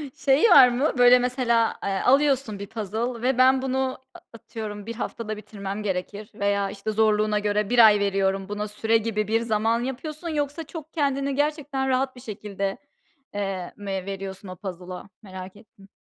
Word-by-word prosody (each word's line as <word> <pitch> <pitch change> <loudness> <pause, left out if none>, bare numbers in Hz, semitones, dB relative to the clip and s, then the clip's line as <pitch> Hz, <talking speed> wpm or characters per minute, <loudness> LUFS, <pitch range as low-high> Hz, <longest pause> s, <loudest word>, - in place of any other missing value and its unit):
Şey 270 +1 +2
var 265 -7 +9
mı? 255 +5 0
Böyle, 245 0 +7
mesela, 245 -2 +1
eee, - - -1
alıyorsun 270 -5 +2
bir 200 - -6
puzzle 225 +3 -4
ve 255 +1 +1
ben 260 +1 +5
bunu 265 0 -1 0.2
a 355 - -12
atıyorum 215 -2 -7
bir 230 - -5
haftada 215 -2 -5
bitirmem 205 -1 -6
gerekir, 200 +2 -4
veya 200 -1 0
işte 200 +2 -4
zorluğuna 215 -1 +2
göre 210 0 0
bir 245 - +3
ay 210 -1 +4
veriyorum 195 -1 0
buna, 210 0 -3
süre 220 +2 +1
gibi 215 -2 -2
bir 225 +1 +1
zaman 225 +1 +1
yapıyorsun? 305 +6 -5
Yoksa 295 +1 -2
çok 320 0 -10
kendini 275 -2 0
gerçekten 290 -2 -1
rahat 260 0 0
bir 250 - -12
şekilde, 200 -3 -4 0.6
eee, 195 -3 -4
mi 205 -1 -6
veriyorsun 195 0 -6
o 185 - -7
puzzle'a? 185 0 -8
Merak 185 -1 -9
ettim. 200 -2 -19
220 Hz, 170 wpm, -25 LUFS, 200-260 Hz, 0.6 s, var